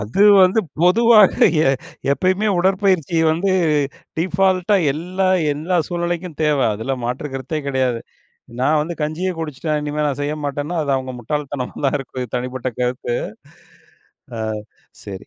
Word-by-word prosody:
அது 110 - -3 0.2
வந்து 185 +4 +4 0.2
பொதுவாக 215 +2 +6 0.3
எ - - +4 0.4
எப்பயுமே 185 +7 +1
உடற்பயிற்சி 185 -3 +1
வந்து 170 +5 0 0.7
டீபால்ட்டா 185 +3 +2 0.2
எல்லா 180 +5 -2 0.2
எல்லா 160 +5 -1
சூழ்நிலைக்கும் 175 -1 -3
தேவ, 150 -2 +2 0.2
அதுல 130 +5 -3
மாற்று 125 +5 -3
கருத்தே 135 +4 -3
கெடையாது. 130 -3 0 0.6
நான் 150 +3 +3
வந்து 170 +2 -5
கஞ்சியே 165 +5 -2
குடிச்சிட்டேன் 155 -1 -2
இனிமே 150 +1 -2
நான் 145 0 -2
செய்யமாட்டேன்னா 145 +2 -3
அது 140 - -1
அவங்க 130 -1 -4
முட்டாள்தனமா 140 +1 -4
தான் 140 - +1
இருக்கும், 130 -1 -6
என்னோட 120 - -10
தனிப்பட்ட 125 0 -3
கருத்து. 125 -1 -1 1.2
ஆ - - -3 0.6
சரி. 100 0 -8
150 Hz, 130 wpm, -20 LUFS, 130-180 Hz, 1.2 s, பொதுவாக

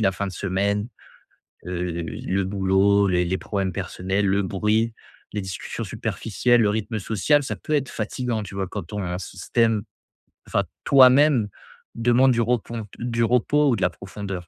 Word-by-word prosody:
la 95 -3 +3
fin 100 +2 -3
de 95 - -5
semaine, 100 +3 -1 0.8
heu, 90 0 -3 0.2
le 95 +4 -2
boulot, 100 +1 +3
les 90 -1 +2
les 95 +2 -1
problèmes 95 -2 -2
personnels, 95 +4 -2
le 100 +1 +2
bruit, 105 +4 0 0.4
les 105 - -2
discussions 95 -2 -5
superficielles, 120 +3 0
le 105 - +3
rythme 110 +1 -2
social, 115 +9 +2
ça - - -3
peut 155 - -5
être 140 -3 +1
fatigant 115 +1 -3
tu 100 0 -9
vois? 95 -1 -2
Quand 100 0 -5
ton 90 0 -4
système, 115 +3 0 0.6
enfin - - +1 0.2
toi-même, 130 -3 +6 0.5
demande 120 +3 +4
du 120 - +1
repos, 115 -1 -1
du 115 -1 -1
repos 130 +5 +3
ou 125 - +3
de 100 - -6
la 90 - +4
profondeur. 95 -2 -7
105 Hz, 160 wpm, -23 LUFS, 95-120 Hz, 0.8 s, toi-même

